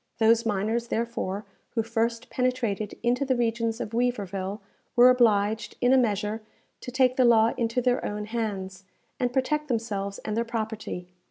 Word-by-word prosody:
Those 225 +1 +4
miners, 220 +3 0
therefore, 225 -4 -2 0.3
who 225 - +2
first 230 +1 -2
penetrated 245 -5 -1
into 245 +3 +2
the 265 -2 +1
regions 230 -1 0
of 210 - -4
Weaverville, 205 -5 -1 0.4
were 245 +1 +8
obliged, 220 -3 +2
in 245 +1 +4
a - - +6
measure, 215 -1 0 0.4
to - - -7
take 255 0 +2
the 260 - +5
law 230 -1 +5
into 235 +1 0
their 250 0 +2
own 210 0 -3
hands, 200 -4 -4 0.4
and 245 -2 +1
protect 300 +4 0
themselves 210 -5 -2
and 210 - -2
their 230 - +1
property. 220 -5 -4
230 Hz, 160 wpm, -26 LUFS, 210-245 Hz, 0.4 s, were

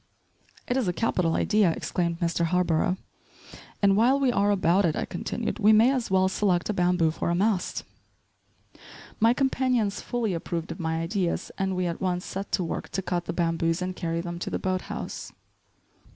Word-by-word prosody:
"It 245 - 0
is 250 -7 0
a 180 - +1
capital 180 -6 0
idea," 210 -5 +3
exclaimed 170 -2 -2
Mr. 170 0 0
Harborough. 180 +1 +1 0.9
"And 195 -1 +5
while 245 +6 +4
we 270 -3 +3
are 200 -3 +2
about 190 -1 +3
it," 160 -4 +1
I - - -2
continued, 225 +7 -4
"we 215 +1 +6
may 225 +4 +6
as 255 -4 -1
well 190 0 +3
select 190 -2 0
a - - -3
bamboo 180 -3 +2
for 165 - -3
a 170 - +1
mast." 195 0 0 1.4
My 230 +2 +4
companions 255 -6 +1
fully 235 -5 -2
approved 170 0 -4
of - - -7
my 160 -1 -1
ideas 175 +1 -2
and 190 -1 0
we 180 0 0
at 170 -1 -3
once 180 -1 -1
set 195 +1 -5
to 185 - +2
work 165 - -4
to 190 +3 -2
cut 175 -1 -2
the - - -3
bamboos 165 0 0
and 185 0 -3
carry 165 -2 -2
them 175 0 -6
to - - -4
the - - -1
boat 185 -1 -1
house. - - -6
185 Hz, 190 wpm, -26 LUFS, 170-210 Hz, 1.4 s, we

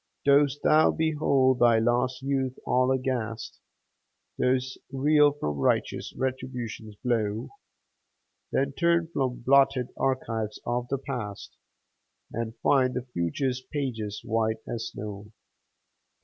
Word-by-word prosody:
Dost 140 0 +4
thou 155 +1 +5
behold 140 -5 +2
thy 120 -1 +5
lost 125 +3 +1
youth 135 -2 -1
all 125 +1 +2
aghast? 125 -4 -2 0.8
Dost 130 0 0
reel 145 +2 +4
from 75 - -3
righteous - - 0
Retribution's 125 -4 -4
blow? 110 -3 0 1.0
Then 140 +1 +1
turn 170 +1 +2
from 130 -3 -1
blotted 135 -1 +4
archives 115 -5 -2
of 120 0 -1
the 135 - -1
past, 120 -7 -6 0.8
And 115 0 -4
find 130 -2 +3
the 125 - -3
future's 125 - -1
pages 120 -8 -4
white 110 -1 0
as 115 -1 -3
snow. 105 0 -8
125 Hz, 110 wpm, -27 LUFS, 115-135 Hz, 1.0 s, thou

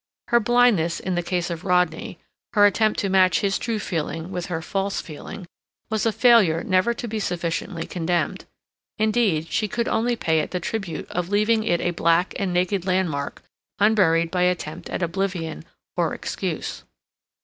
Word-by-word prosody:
Her 235 - +5
blindness 230 -8 +3
in 185 - -3
the 175 - 0
case 175 0 -2
of 165 -2 -5
Rodney, 180 +3 0 0.4
her 205 -1 +6
attempt 215 +1 +2
to 200 - 0
match 185 -3 +4
his 195 -1 0
true 230 -2 -2
feeling 165 -2 -3
with 180 -2 -4
her 165 -3 -2
false 195 +4 -2
feeling, 160 +4 -8 0.5
was 220 +1 +1
a - - +3
failure 215 -9 +4
never 195 +5 +2
to 240 - -5
be 220 0 -3
sufficiently 175 -4 -3
condemned; 175 0 -1 0.5
indeed, 215 -7 +1
she 215 - +1
could 235 +3 -2
only 240 +2 +1
pay 160 -7 +1
it - - -2
the 180 - -2
tribute 195 -1 -4
of 175 0 -2
leaving 215 +2 +2
it 175 -4 +1
a 175 - 0
black 170 +1 +2
and 195 -2 -1
naked 180 +1 0
landmark 175 -7 -1 0.3
unburied 175 -6 +3
by 180 - 0
attempt 180 -2 -1
at - - -2
oblivion 170 - -3 0.3
or - - 0
excuse. - - -4
185 Hz, 170 wpm, -23 LUFS, 170-210 Hz, 0.5 s, her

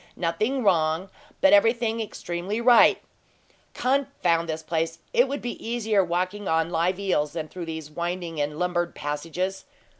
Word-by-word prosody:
"Nothing 215 +10 -1
wrong, 170 -1 +2 0.3
but 290 +1 +6
everything 230 -5 +3
extremely 190 0 -4
right. 240 0 +6 0.7
Confound 250 -12 +1
this 160 0 -3
place! 165 0 -2 0.2
It 245 +3 +4
would 280 +2 -4
be 240 - -5
easier 220 -4 +1
walking 185 +3 -2
on 165 +1 +1
live 175 +2 +1
eels 150 -7 0
than 160 -2 -4
through 175 +1 -7
these 160 -2 -6
winding 170 -1 -3
and 150 +1 -2
lumbered 175 0 -1
passages. 165 +6 -3
180 Hz, 145 wpm, -25 LUFS, 165-220 Hz, 0.7 s, but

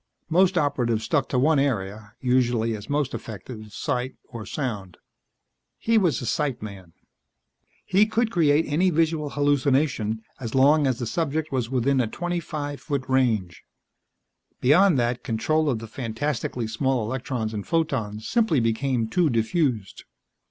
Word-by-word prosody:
Most 180 +2 +3
Operatives 125 -7 +1
stuck 135 +4 0
to 130 - 0
one 150 +3 +3
area 105 -6 -2
usually, 120 -3 +1
as 105 +4 -10
most 145 -2 0
effective, 110 +1 -8
sight 130 +1 -3
or 115 -5 -8
sound. 105 - -4 0.8
He 230 0 +2
was 175 -7 +1
a - - -4
sight 140 -1 -1
man. 95 -5 -9 0.9
He 200 +3 +4
could 230 +1 0
create 155 -4 +3
any 165 +6 +2
visual 160 -2 +1
hallucination, 135 -6 +1 0.2
as 115 -2 -5
long 145 +2 +5
as 130 -3 0
the 120 - -3
subject 155 +3 -2
was 125 -4 -1
within 130 +1 +2
a 120 - 0
twenty 175 +8 -3
five 145 -3 -5
foot 140 -4 -3
range. 115 -9 +1 1.0
Beyond 165 +5 +5
that, 120 0 0
control 145 +8 0
of 125 - 0
the 115 - -7
fantastically 120 +1 -3
small 120 +1 0
electrons 120 -2 -3
and 105 -2 -5
photons 115 -10 -1
simply 220 - +2
became 115 +1 0
too 165 +7 +2
diffused. 115 - -1
130 Hz, 145 wpm, -25 LUFS, 115-150 Hz, 1.0 s, long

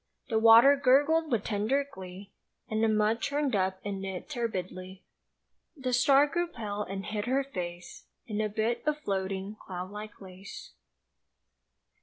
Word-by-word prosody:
The 220 -2 +2
water 230 +5 +8
gurgled 290 +4 +3
with 225 -4 +1
tender 220 +7 0
glee 190 -2 -10 0.4
And 220 0 -1
the - - +4
mud 215 +1 +2
churned 285 -4 0
up 190 -1 0
in 195 -1 -4
it 190 -2 -5
turbidly. 190 -6 -4 0.7
The 255 -2 -2
star 270 +3 +5
grew 345 +4 -1
pale 210 -9 -5
and 195 -1 -5
hid 210 -1 -3
her 265 +3 +1
face 175 -9 -7 0.2
In 215 -1 -2
a 215 - 0
bit 220 +3 -1
of 300 0 +1
floating 195 -4 -3
cloud 185 0 -6
like 210 +1 -9
lace. 190 0 -11
215 Hz, 150 wpm, -29 LUFS, 195-255 Hz, 0.7 s, water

